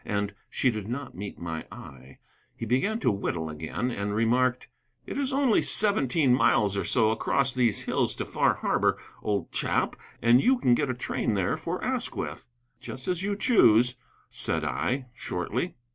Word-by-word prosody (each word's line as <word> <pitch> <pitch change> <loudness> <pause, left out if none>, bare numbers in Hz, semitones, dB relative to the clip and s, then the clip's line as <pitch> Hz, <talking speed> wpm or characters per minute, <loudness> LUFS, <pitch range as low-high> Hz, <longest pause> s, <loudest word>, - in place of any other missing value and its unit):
And 100 0 -2 0.2
she 130 - +1
did 105 -3 -5
not 125 +2 -5
meet 100 +2 -7
my 80 -2 -5
eye. 65 0 -12 0.4
He - - -5
began 130 - +1
to - - +3
whittle 85 -5 -3
again, 80 +11 -3
and 100 -2 -3
remarked: 125 +3 +1 0.4
"It - - -6
is 275 -1 0
only 270 -4 +3
seventeen 150 - +2
miles 105 -5 +3
or 100 - -1
so 110 -2 +3
across 135 +4 +1
these 120 -5 +2
hills - - 0
to - - -4
Far - - +1
Harbor, - - +1 0.2
old 105 -2 -2
chap, - - 0 0.2
and 120 +3 +5
you 260 +1 +4
can 125 - +3
get 140 +2 +1
a 125 - -1
train 115 -3 -2
there 95 -3 +1
for - - -4
Asquith." - - -3 0.3
"Just 130 - -7
as 180 -1 0
you 200 +1 -1
choose," 125 - +4 0.3
said - - -1
I, 130 +1 -1
shortly. 115 - -3
120 Hz, 170 wpm, -27 LUFS, 100-135 Hz, 0.4 s, and